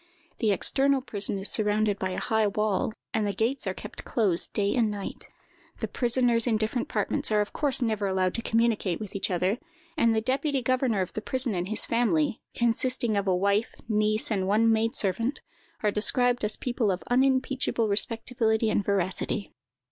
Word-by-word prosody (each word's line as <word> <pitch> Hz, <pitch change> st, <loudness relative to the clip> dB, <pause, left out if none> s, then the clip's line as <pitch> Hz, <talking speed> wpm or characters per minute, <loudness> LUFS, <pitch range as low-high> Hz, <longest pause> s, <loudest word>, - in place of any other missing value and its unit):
The 220 Hz, -3 st, +2 dB
external 270 Hz, +7 st, +2 dB
prison 205 Hz, -5 st, -3 dB
is 195 Hz, +1 st, -2 dB
surrounded 210 Hz, -1 st, +1 dB
by 190 Hz, -, -1 dB
a 185 Hz, -, -4 dB
high 220 Hz, -2 st, +1 dB
wall, 210 Hz, 0 st, 0 dB, 0.2 s
and 215 Hz, -2 st, +1 dB
the 200 Hz, -, -1 dB
gates 235 Hz, +7 st, -1 dB
are -, -, 0 dB
kept -, -, -8 dB
closed 195 Hz, -7 st, +1 dB
day 200 Hz, -1 st, 0 dB
and 235 Hz, -4 st, +2 dB
night. 205 Hz, -2 st, -6 dB, 0.5 s
The -, -, -2 dB
prisoners 240 Hz, -1 st, +1 dB
in 225 Hz, -3 st, +2 dB
different 220 Hz, +3 st, -2 dB
apartments 210 Hz, +1 st, -1 dB
are 210 Hz, -, +3 dB
of 210 Hz, -, -2 dB
course 275 Hz, -3 st, +2 dB
never 215 Hz, -3 st, 0 dB
allowed 185 Hz, -1 st, 0 dB
to 230 Hz, -, -2 dB
communicate 225 Hz, -6 st, +1 dB
with 210 Hz, -3 st, -8 dB
each 200 Hz, -, -1 dB
other, 185 Hz, +5 st, 0 dB, 0.4 s
and 230 Hz, -1 st, +3 dB
the -, -, +3 dB
deputy 265 Hz, +3 st, -1 dB
governor 255 Hz, -4 st, +1 dB
of 185 Hz, -, -4 dB
the 215 Hz, -, -4 dB
prison 255 Hz, 0 st, -1 dB
and 180 Hz, -1 st, -2 dB
his 220 Hz, -, +3 dB
family, 215 Hz, -6 st, +1 dB
consisting 240 Hz, -1 st, +1 dB
of 200 Hz, -1 st, -1 dB
a 185 Hz, -, +3 dB
wife, 200 Hz, +4 st, +1 dB
niece, 215 Hz, 0 st, +1 dB
and 190 Hz, -3 st, 0 dB
one 220 Hz, +3 st, +3 dB
maid 225 Hz, +3 st, +1 dB
servant, 230 Hz, +6 st, -1 dB, 0.4 s
are 210 Hz, -, +3 dB
described 245 Hz, +4 st, +2 dB
as 210 Hz, 0 st, 0 dB
people 240 Hz, -4 st, -1 dB
of 185 Hz, -1 st, -2 dB
unimpeachable 260 Hz, -2 st, +2 dB
respectability 225 Hz, +1 st, 0 dB
and 205 Hz, -, +1 dB
veracity. 195 Hz, +1 st, -2 dB
220 Hz, 185 wpm, -27 LUFS, 200-240 Hz, 0.5 s, are